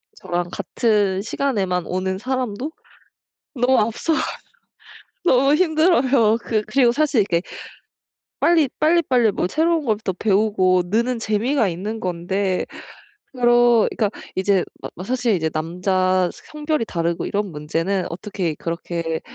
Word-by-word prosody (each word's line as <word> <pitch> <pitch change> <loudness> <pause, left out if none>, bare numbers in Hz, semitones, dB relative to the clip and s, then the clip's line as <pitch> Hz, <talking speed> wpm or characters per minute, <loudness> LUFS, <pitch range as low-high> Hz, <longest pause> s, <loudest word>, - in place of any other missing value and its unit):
저랑 175 - -3
같은 205 -5 0
시간에만 200 -7 -1
오는 190 +1 -2
사람도 255 +3 -3 0.8
너무 255 0 +3
앞서가서 230 +9 0 1.0
너무 275 -2 +4
힘들어요. 280 -9 +3
그 220 -2 0
그리고 255 -3 +3
사실 290 -5 +2
이렇게 170 -4 0 1.0
빨리 330 -4 +4
빨리빨리 285 -9 +3
뭐 180 - -1
새로운 320 - +1
걸 220 -4 +1
또 - - 0
배우고 190 -2 +2
느는 235 +4 0
재미가 225 +2 +1
있는 205 +6 -4
건데 185 +2 -1 0.7
그러니까 240 -3 +3 0.3
이제 190 -1 +2 0.2
마 - - -6
막 180 - -7
사실 245 -4 +1
인제 160 -3 -1
남자 180 +3 0
성별이 300 -5 -3
다르고 170 -2 -2
이런 205 -1 -2
문제는 165 +6 -2
어떻게 175 -1 -3
그렇게 165 0 -4
210 Hz, 275 characters per minute, -21 LUFS, 185-255 Hz, 1.0 s, 너무